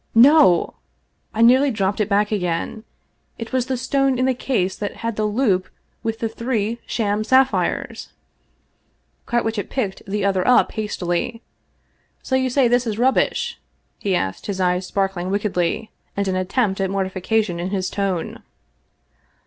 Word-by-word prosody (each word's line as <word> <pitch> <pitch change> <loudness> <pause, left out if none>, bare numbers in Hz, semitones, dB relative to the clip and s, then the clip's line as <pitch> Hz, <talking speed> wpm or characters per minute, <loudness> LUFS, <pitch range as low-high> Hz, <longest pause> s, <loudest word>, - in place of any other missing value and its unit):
No! 245 - +6 0.5
I 225 - +1
nearly 260 +4 +6
dropped 200 -4 -1
it 210 - 0
back 205 +1 +2
again. 185 +3 -2 0.5
It 230 +2 -7
was 255 -1 +1
the 260 -1 -1
stone 270 +1 +1
in 255 - +1
the 260 - +2
case 215 -7 -1
that 205 - -4
had 230 -1 -1
the 215 - 0
loop 205 -5 +1 0.3
with 225 0 -2
the 225 - -1
three 230 -1 -2
sham 210 -2 0
sapphires! 260 +3 +1 1.2
Carwitchet 225 -3 -1
picked 205 -8 -2
the 200 0 -1
other 190 -2 +1
up 250 - +5
hastily. 210 +1 -3 0.4
" - - -43
So 260 - -1
you 260 0 +1
say 255 0 +3
this 245 0 +2
is 215 -2 -2
rubbish? 260 +3 +1 0.2
" - - -46
he 195 -2 0
asked, 95 - -3
his 195 -2 -3
eyes 180 0 +1
sparkling 190 -2 -1
wickedly, 200 0 -1 0.3
and 200 0 0
an 190 - 0
attempt 195 +2 0
at 190 - 0
mortification 190 0 -1
in 175 +2 -3
his 190 -2 -1
tone. 195 -4 -2
210 Hz, 155 wpm, -21 LUFS, 190-240 Hz, 1.2 s, No